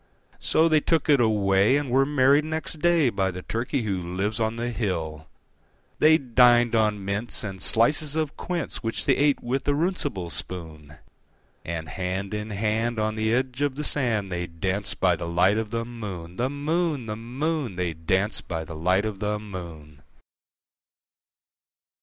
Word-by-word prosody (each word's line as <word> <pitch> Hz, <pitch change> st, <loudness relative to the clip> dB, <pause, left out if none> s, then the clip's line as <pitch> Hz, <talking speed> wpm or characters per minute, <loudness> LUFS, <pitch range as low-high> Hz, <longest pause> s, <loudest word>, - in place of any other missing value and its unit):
So 160 Hz, -, +3 dB
they 155 Hz, -2 st, +4 dB
took 160 Hz, +1 st, 0 dB
it 140 Hz, -3 st, +5 dB
away, 105 Hz, +2 st, +3 dB
and 145 Hz, -4 st, -3 dB
were 135 Hz, +2 st, +4 dB
married 145 Hz, 0 st, +4 dB
next 160 Hz, 0 st, -4 dB
day 165 Hz, -5 st, +3 dB
By 95 Hz, -2 st, 0 dB
the 90 Hz, 0 st, -6 dB
Turkey 120 Hz, +3 st, -2 dB
who 95 Hz, -4 st, -2 dB
lives 95 Hz, +5 st, -2 dB
on 110 Hz, 0 st, 0 dB
the 120 Hz, +1 st, -3 dB
hill. 80 Hz, -9 st, -3 dB, 0.7 s
They 160 Hz, +1 st, +6 dB
dined 120 Hz, -3 st, +4 dB
on 105 Hz, -3 st, +1 dB
mince 105 Hz, +5 st, -2 dB
and 95 Hz, -3 st, -6 dB
slices 145 Hz, +6 st, +2 dB
of 155 Hz, -3 st, -1 dB
quince, 175 Hz, -2 st, -3 dB
Which 115 Hz, -1 st, -3 dB
they 135 Hz, -, +4 dB
ate 145 Hz, 0 st, +2 dB
with 130 Hz, +3 st, -2 dB
a 145 Hz, -, +3 dB
runcible 145 Hz, -, -1 dB
spoon; 80 Hz, -2 st, -5 dB, 0.7 s
And 80 Hz, -1 st, -4 dB
hand 95 Hz, +5 st, -3 dB
in 105 Hz, +1 st, -4 dB
hand, 110 Hz, +3 st, -1 dB
on 110 Hz, 0 st, 0 dB
the 110 Hz, 0 st, 0 dB
edge 130 Hz, +2 st, -1 dB
of 145 Hz, -2 st, +1 dB
the 150 Hz, -, -4 dB
sand, 115 Hz, -10 st, 0 dB
They 90 Hz, 0 st, -2 dB
danced 95 Hz, +4 st, -3 dB
by 90 Hz, -2 st, +3 dB
the 85 Hz, 0 st, -5 dB
light 90 Hz, +5 st, +3 dB
of 110 Hz, -1 st, -3 dB
the 115 Hz, +1 st, -2 dB
moon, 95 Hz, -8 st, -7 dB
The 125 Hz, +2 st, 0 dB
moon, 150 Hz, -1 st, -1 dB
The 105 Hz, -1 st, -4 dB
moon, 130 Hz, -, -3 dB
They 90 Hz, -2 st, -1 dB
danced 95 Hz, +6 st, -1 dB
by 80 Hz, -2 st, -3 dB
the 80 Hz, -, -8 dB
light 90 Hz, +6 st, +1 dB
of 105 Hz, -3 st, -4 dB
the 105 Hz, 0 st, -1 dB
moon. 85 Hz, -8 st, -9 dB
110 Hz, 170 wpm, -25 LUFS, 95-135 Hz, 0.7 s, They